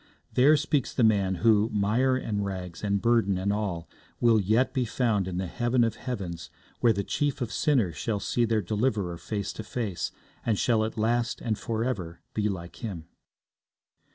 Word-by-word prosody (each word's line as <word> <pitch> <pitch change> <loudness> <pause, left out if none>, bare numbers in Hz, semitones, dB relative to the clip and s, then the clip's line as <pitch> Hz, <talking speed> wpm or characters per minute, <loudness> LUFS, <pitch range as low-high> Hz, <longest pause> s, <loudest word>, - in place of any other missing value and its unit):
There 145 +5 +6
speaks 145 -2 0
the 125 - +2
man, 100 -4 +3
who, 110 -1 +5
mire, 110 +6 +2
and 105 -5 -2
rags, 90 -3 -5
and 100 -1 +1
burdens 115 -4 +2
and 100 +2 0
all, 95 -6 -3 0.3
will 115 -3 +4
yet 110 +7 +2
be 130 - +1
found 110 -5 0
in 90 -1 -3
the 95 - -1
heaven 120 +6 +1
of 115 - +1
heavens 95 -9 -5 0.3
where 120 - +5
the 100 -2 -1
chief 145 +7 -1
of 120 -3 -3
sinners 115 - +1
shall 110 -3 -1
see 120 - 0
their 110 -2 +1
Deliverer 105 -4 -1
face 100 +3 -3
to 110 - -6
face, 105 -5 -3 0.3
and 110 -3 +1
shall 115 -1 +2
at 110 - -5
last 120 +2 +1
and 110 -2 -1
for 115 -1 -2
ever 90 -10 -3
be 105 -1 0
like 85 -3 -6
Him. 90 -8 -6
110 Hz, 180 wpm, -27 LUFS, 95-120 Hz, 0.3 s, There